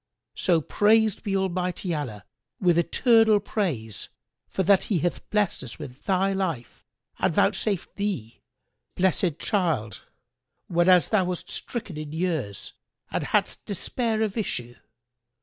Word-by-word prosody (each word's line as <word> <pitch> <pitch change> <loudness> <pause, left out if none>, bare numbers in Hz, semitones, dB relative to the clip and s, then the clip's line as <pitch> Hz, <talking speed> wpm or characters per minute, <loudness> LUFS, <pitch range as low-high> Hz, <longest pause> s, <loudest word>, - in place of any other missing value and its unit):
So 170 -3 +2
praised 215 +5 +3
be 195 -1 -1
Almighty 180 -1 -1
Allah 125 -10 -4 0.3
with 175 -3 +3
eternal 225 +4 +4
praise 155 - -3 0.4
for 190 - -1
that 195 +1 +4
He 200 - +1
hath 170 +2 -2
blessed 210 -3 +1
us - - -7
with 145 -3 -10
thy 195 +1 +2
life 170 - -3 0.4
and - - +2
vouchsafed 200 -5 0
thee 190 - -3 0.5
this 185 0 +2
blessed 170 -6 0
child, 160 - -1 0.7
whenas 175 +1 +4
thou 205 -4 +3
wast 180 -1 -4
stricken 210 -9 -5
in 155 -1 -6
years 160 - -2 0.4
and - - -1
hadst - - 0
despaired 220 +3 -1
of 215 0 -2
issue! 120 - -3
180 Hz, 130 wpm, -26 LUFS, 155-205 Hz, 0.7 s, eternal